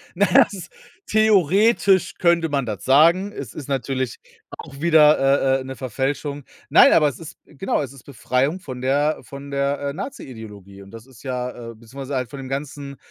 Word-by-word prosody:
Na 205 - +3
ja, 275 +1 +7
es - - -13
ist 180 -3 -9 0.4
theoretisch 205 -1 +3
könnte 170 -2 +2
man 140 -3 -1
das 105 -6 -6
sagen. 170 +9 +4
Es 140 - -8
ist 145 - -8
natürlich 130 -2 -3 0.4
auch 140 - -11
wieder, 145 -4 +4
äh, - - -6
äh, - - -7
'ne 130 0 -7
Verfälschung. 140 +3 -4 0.3
Nein, - - +7
aber 155 -2 +4
es 135 -5 -5
ist 165 - -11
genau, 150 +4 -3
es 140 -2 -6
ist 135 -4 -15
Befreiung 135 - -1
von 130 -8 -8
der 145 +4 +1
von 140 +3 -10
der, 140 0 -1
äh, - - -5
Nazi-Ideologie 110 - -9
und 100 0 -14
das 115 0 -12
ist 130 -3 -18
ja 125 -2 -5
äh, - - -14
beziehungsweise 130 +5 -8
halt 125 -2 -2
von 140 - -9
dem 130 -1 -8
ganzen, 140 0 -6
140 Hz, 190 wpm, -21 LUFS, 130-155 Hz, 0.4 s, ja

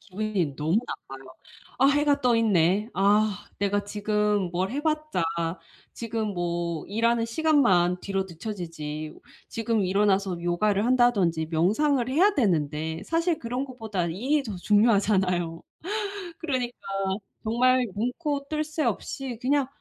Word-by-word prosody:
기분이 195 -7 -2
너무 160 +6 +1
나빠요. 135 0 -8 0.5
'아. 270 - +5
해가 285 0 +3
떠 245 -3 +3
있네. 205 0 +2
아. 205 +1 +2
내가 205 0 0
지금 210 -2 0
뭘 185 +3 -1
해 285 +3 -3
봤자 305 - -1 0.7
지금 220 -3 -3
뭐 170 -2 -2
일하는 230 +3 +1
시간만 230 - +3
뒤로 195 -1 -2
늦춰지지. 165 -5 -6 0.3
지금 225 -1 -1
일어나서 195 -2 +1
요가를 200 +4 +1
한다든지 210 -11 +3
명상을 235 - +2
해야 370 +10 +4
되는데.' 160 - 0
사실 330 +2 0
그런 245 +3 -3
것보다 220 -8 -4
일이 260 - 0
더 215 -6 -6
중요하잖아요. 190 -5 +2 0.8
그러니까 255 -7 -2 0.7
정말 250 +3 +3
눈코 280 +5 -2
뜰 305 0 -1
새 310 0 -2
없이 265 -5 -3
그냥 275 +1 +2
210 Hz, 270 characters per minute, -26 LUFS, 180-255 Hz, 0.8 s, 아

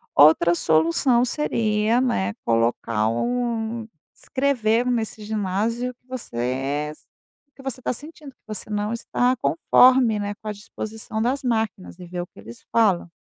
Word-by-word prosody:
outra 165 +3 +6
solução 165 - +3
seria, 225 -4 +1
né, 100 - +1
colocar 115 -1 +1
um 230 - -2 0.3
escrever 250 -4 +1
nesse 225 -3 -2
ginásio 220 +4 -1
que 250 - -42
você 255 - -7
é 135 +4 -1
s 155 - -16 0.4
o - - -53
que 270 - -13
você 265 -1 -4
tá - - -1
sentindo, 295 +2 -8
que - - -37
você 215 -1 -6
não 210 +1 -1
está 245 +2 +1
conforme, 255 -8 +4
né, 205 0 -3
com 215 - -12
a - - -1
disposição 215 +1 -6
das 260 +4 0
máquinas 220 -6 -2
e 180 - -9
ver 175 0 -5
o 175 - -6
que - - -18
eles 115 - -12
falam. 200 -7 +2
220 Hz, 160 wpm, -23 LUFS, 175-245 Hz, 0.4 s, outra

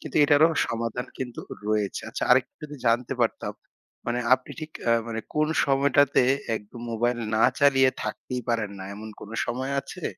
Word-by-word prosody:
কিন্তু 155 - -6
এটারও 150 +3 +5 0.2
সমাধান 115 +1 -3
কিন্তু 125 -2 -5 0.3
রয়েছে। 105 -2 0
আচ্ছা, - - -2
আরেকটা - - +4
যদি 150 -1 -7
জানতে 115 +1 +2
পারতাম - - -1 0.5
মানে 120 +1 0 0.2
আপনি 130 - -9
ঠিক 155 0 -6 0.2
আ - - +6
মানে 115 -1 -3
কোন 150 0 +2 0.2
সময়টাতে 140 0 +4 0.3
একদম 110 +3 -10
মোবাইল 120 +2 0 0.2
না 110 - +3 0.2
চালিয়ে 135 -2 +5
থাকতেই 125 -1 -4
পারেন 115 -3 0
না, 95 - -7
এমন 110 +2 -8
কোন 105 - -10 0.2
সময় 130 +3 -2
আছে? - - -10
125 Hz, 165 wpm, -26 LUFS, 115-140 Hz, 0.5 s, আ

